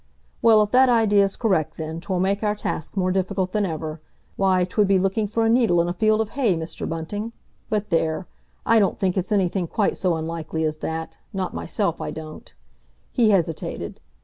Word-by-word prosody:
"Well, 220 Hz, -2 st, +6 dB
if 210 Hz, -, -4 dB
that 255 Hz, +1 st, +6 dB
idea's 205 Hz, -4 st, +3 dB
correct 165 Hz, -9 st, 0 dB
then, 160 Hz, +1 st, -5 dB
'twill 185 Hz, 0 st, -2 dB
make 195 Hz, +2 st, +1 dB
our 210 Hz, -1 st, +1 dB
task 200 Hz, -3 st, -4 dB
more 185 Hz, -1 st, +1 dB
difficult 190 Hz, 0 st, -1 dB
than 210 Hz, -1 st, +1 dB
ever. 155 Hz, -1 st, -5 dB, 0.3 s
Why, 190 Hz, -2 st, +3 dB
'twould 200 Hz, +3 st, +1 dB
be 195 Hz, 0 st, +4 dB
looking 195 Hz, +3 st, 0 dB
for 225 Hz, +2 st, 0 dB
a -, -, +3 dB
needle 230 Hz, -7 st, +4 dB
in 170 Hz, -, +2 dB
a 175 Hz, -, -1 dB
field 215 Hz, +3 st, +2 dB
of 220 Hz, -, -2 dB
hay, 230 Hz, -10 st, +1 dB
Mr. 160 Hz, 0 st, -5 dB
Bunting! 205 Hz, +8 st, -4 dB, 0.4 s
But 210 Hz, -1 st, -1 dB
there! 165 Hz, +1 st, 0 dB, 0.4 s
I 230 Hz, 0 st, +5 dB
don't 200 Hz, -, +1 dB
think 185 Hz, -2 st, 0 dB
it's 190 Hz, +1 st, -2 dB
anything 190 Hz, -3 st, +1 dB
quite 205 Hz, +4 st, 0 dB
so 180 Hz, -3 st, +1 dB
unlikely 160 Hz, 0 st, -3 dB
as 155 Hz, -1 st, -1 dB
that—not 160 Hz, +4 st, -5 dB
myself 195 Hz, -7 st, -2 dB
I -, -, -3 dB
don't." 155 Hz, -1 st, -9 dB, 0.6 s
He 235 Hz, -4 st, +3 dB
hesitated. 170 Hz, -6 st, -1 dB
190 Hz, 190 wpm, -23 LUFS, 165-210 Hz, 0.6 s, Well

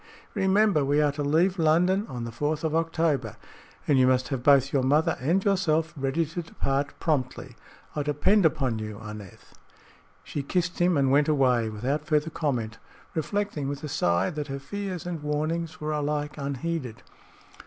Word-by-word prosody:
Remember, 195 Hz, -4 st, +3 dB
we 145 Hz, +2 st, +2 dB
are 150 Hz, -1 st, +3 dB
to 145 Hz, +1 st, -5 dB
leave 170 Hz, +6 st, +2 dB
London 180 Hz, +6 st, +3 dB
on 120 Hz, -2 st, -5 dB
the 115 Hz, -, -5 dB
fourth 150 Hz, +6 st, -2 dB
of 160 Hz, -1 st, 0 dB
October 165 Hz, -2 st, 0 dB, 0.5 s
and 140 Hz, -3 st, +4 dB
you 130 Hz, -, +5 dB
must 130 Hz, 0 st, +2 dB
have 135 Hz, -4 st, -2 dB
both 140 Hz, 0 st, +4 dB
your 135 Hz, -, +3 dB
mother 145 Hz, +5 st, +2 dB
and 170 Hz, +10 st, +1 dB
yourself 170 Hz, -5 st, +1 dB
ready 140 Hz, +4 st, 0 dB
to 165 Hz, +3 st, -5 dB
depart 140 Hz, -3 st, -2 dB
promptly. 135 Hz, -5 st, -2 dB, 0.4 s
I 150 Hz, -, 0 dB
depend 150 Hz, +8 st, +2 dB
upon 135 Hz, -7 st, +1 dB
you, 105 Hz, -1 st, -6 dB
Aneth." 105 Hz, -3 st, -10 dB, 0.7 s
She 145 Hz, -, -4 dB
kissed 180 Hz, +5 st, -1 dB
him 175 Hz, -2 st, +3 dB
and 135 Hz, -2 st, +2 dB
went 145 Hz, +1 st, +4 dB
away 125 Hz, -6 st, +2 dB
without 135 Hz, +8 st, -2 dB
further 155 Hz, 0 st, +1 dB
comment, 115 Hz, -9 st, -2 dB, 0.3 s
reflecting, 170 Hz, -2 st, -2 dB
with 145 Hz, +1 st, -5 dB
a -, -, -3 dB
sigh, 90 Hz, -8 st, +1 dB
that 150 Hz, -1 st, -4 dB
her 135 Hz, -1 st, -4 dB
fears 185 Hz, +5 st, -5 dB
and 175 Hz, -3 st, -4 dB
warnings 155 Hz, +3 st, -2 dB
were 155 Hz, 0 st, -3 dB
alike 150 Hz, 0 st, -2 dB
unheeded. 140 Hz, -2 st, -4 dB
150 Hz, 170 wpm, -26 LUFS, 135-165 Hz, 0.7 s, you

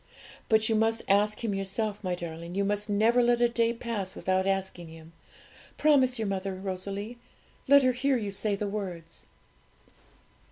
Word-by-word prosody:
But 220 Hz, 0 st, +4 dB
you 225 Hz, -, +1 dB
must 225 Hz, +1 st, +1 dB
ask 210 Hz, +3 st, +2 dB
Him 220 Hz, -3 st, -1 dB
yourself, 200 Hz, +2 st, -3 dB
my 180 Hz, -1 st, -1 dB
darling; 170 Hz, 0 st, -7 dB
you 200 Hz, 0 st, +1 dB
must 205 Hz, +1 st, -1 dB
never 225 Hz, +4 st, +3 dB
let 240 Hz, 0 st, +3 dB
a 240 Hz, -, +4 dB
day 235 Hz, -1 st, +1 dB
pass 230 Hz, -5 st, -4 dB
without 190 Hz, 0 st, 0 dB
asking 190 Hz, -3 st, -2 dB
Him: 160 Hz, 0 st, -13 dB, 0.6 s
promise 265 Hz, -4 st, +3 dB
your 220 Hz, -2 st, -2 dB
mother, 195 Hz, 0 st, -3 dB
Rosalie 200 Hz, +4 st, -5 dB, 0.5 s
let 280 Hz, 0 st, +7 dB
her 255 Hz, -, +4 dB
hear 260 Hz, +2 st, +1 dB
you 205 Hz, -4 st, -4 dB
say 200 Hz, +1 st, 0 dB
the 205 Hz, +1 st, -3 dB
words.' 180 Hz, -5 st, -6 dB
205 Hz, 165 wpm, -28 LUFS, 190-230 Hz, 0.6 s, let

